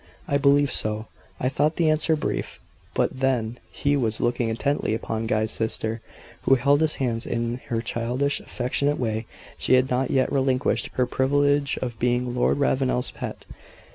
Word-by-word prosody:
"I 140 - +1
believe 140 -1 +4
so." 110 0 0 0.3
I 125 - 0
thought 150 +4 +1
the 170 - +2
answer 155 +1 +3
brief; 150 - -3 0.4
but - - 0
then 125 -3 0
he 145 0 0
was 115 -5 0
looking 120 -1 0
intently 125 0 0
upon 110 0 -3
Guy's 110 0 0
sister, 110 0 -2 0.4
who 135 - +4
held 140 +4 +3
his 155 -1 +2
hands 120 -3 -2
in 120 +1 -2
her 115 -1 -1
childish, 125 +6 -1
affectionate 140 +4 -1
way; 110 -2 -2 0.3
she 130 - +4
had 130 +1 +2
not 125 +1 +1
yet 130 -1 +2
relinquished 135 -1 +1
her 125 - +2
privilege 140 +2 +1
of 120 -3 -5
being 125 0 0
Lord 125 - +2
Ravenel's 130 -2 +1
"pet." - - -7
130 Hz, 165 wpm, -24 LUFS, 115-140 Hz, 0.4 s, believe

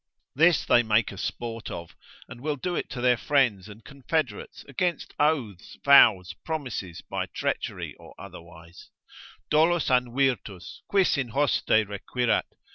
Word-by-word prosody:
This 165 +3 +3
they 120 - +5
make 110 -1 +1
a 100 - -10
sport 115 -1 -5
of, 85 -1 -8 0.3
and 120 +1 -11
will 150 +1 -2
do 175 +6 -4
it - - -3
to 125 - -6
their 125 -1 +3
friends 115 -7 +1
and 105 +2 -14
confederates, 140 +3 -4
against 170 +6 -2
oaths, 130 - -1
vows, 95 -10 +6
promises, 125 - -5
by - - -3
treachery - - -4
or - - -15
otherwise; 85 0 -13 0.6
—dolus 160 0 +3
an 125 -1 +1
virtus? 125 -9 -2
quis 190 -7 +2
in 130 -3 -2
hoste 140 +4 0 0.2
requirat? 115 +4 -1
125 Hz, 140 wpm, -26 LUFS, 105-145 Hz, 0.6 s, vows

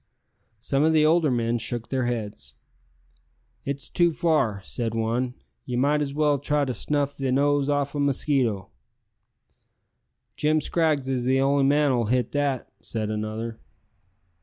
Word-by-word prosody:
Some 135 +4 0
of 160 +1 +3
the 155 -1 +4
older 160 -1 +4
men 120 -1 0
shook 115 +1 -3
their 130 -2 0
heads. 105 - -5 1.1
"It's 140 0 -4
too 175 -1 +2
far," 155 - +1
said 115 0 -3
one; 120 +3 -1 0.3
"ye 125 - -4
might 145 +4 +2
as 140 -2 -2
well 150 -2 +2
try 145 +1 +1
to 130 - -2
snuff 145 +4 -1
the 135 -2 -2
nose 145 +1 +2
o' 145 0 +2
a 140 +1 -6
mosquito." 130 -8 0 1.6
"Jim 155 +1 +2
Scraggs 155 -3 0
is 130 -2 -1
the 130 +1 +3
only 140 0 +3
man 145 +1 +3
as'll 120 -3 +1
hit 125 +1 0
that," 145 -3 -1
said 110 -2 -3
another. 110 +2 -4
135 Hz, 150 wpm, -25 LUFS, 115-145 Hz, 1.6 s, the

